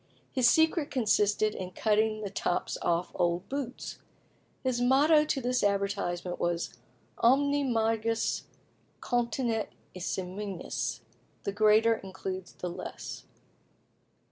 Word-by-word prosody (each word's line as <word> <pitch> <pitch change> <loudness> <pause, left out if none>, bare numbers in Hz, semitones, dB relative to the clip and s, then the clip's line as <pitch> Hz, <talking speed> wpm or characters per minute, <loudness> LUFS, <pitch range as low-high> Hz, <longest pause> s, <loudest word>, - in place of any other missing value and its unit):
His 255 -3 +4
secret 320 0 +3
consisted 210 -3 +2
in 185 -1 -6
cutting 215 +1 +1
the 200 -2 -4
tops 180 - -1
off 170 +1 0
old 175 +1 0
boots. 270 -3 -5 0.6
His 255 -2 0
motto 295 +5 +5
to 300 - 0
this 250 0 0
advertisement 200 -3 0
was 175 0 -1 0.5
"Omne 280 +2 +3
majus 225 0 0 0.5
continet 235 -2 -1 0.2
in 185 - -8
se 185 - -1
minus" 190 -6 -4 0.4
("The - - -1
greater 215 +2 +5
includes 190 -1 -6
the 180 - -5
less"). - - -7
215 Hz, 115 wpm, -30 LUFS, 190-250 Hz, 0.6 s, motto